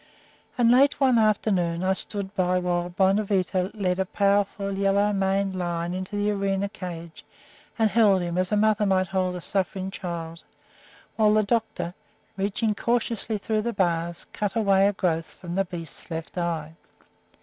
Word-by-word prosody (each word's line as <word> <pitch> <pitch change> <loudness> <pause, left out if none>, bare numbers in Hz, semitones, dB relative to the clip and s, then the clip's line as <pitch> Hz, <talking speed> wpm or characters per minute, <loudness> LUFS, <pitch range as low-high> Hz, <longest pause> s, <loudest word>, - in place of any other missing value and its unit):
And 235 -2 +4
late 275 +3 +4
one 260 -4 +4
afternoon 190 -5 +1
I 190 +1 +3
stood 200 0 -4
by 185 -2 +1
while 175 -1 -1
Bonavita 190 0 +1
led 185 -3 0
a 190 - +1
powerful, 200 0 0
yellow 200 +1 +2
maned 195 0 0
lion 175 -1 -2
into 185 +2 -5
the 205 0 +1
arena 200 0 -1
cage 170 -4 -8 0.5
and 220 -1 +4
held 205 -4 +4
him, 175 0 -3
as 185 +2 0
a 210 - +2
mother 215 0 +3
might 190 -1 +2
hold 185 -1 -1
a 180 - -6
suffering 190 +1 -2
child, 170 -3 -6 0.7
while 215 -1 +4
the 215 - +4
doctor, 220 -5 -1 0.4
reaching 200 +3 0
cautiously 230 -1 -1
through 215 +1 -1
the 235 +2 -2
bars, 170 -2 -1
cut 205 0 -2
away 200 -3 +4
a 205 - +1
growth 165 -4 -1
from 175 -1 -7
the 195 +1 +1
beast's 170 -4 -8
left 160 -1 -6
eye. 165 -3 -2
195 Hz, 160 wpm, -25 LUFS, 180-210 Hz, 0.7 s, And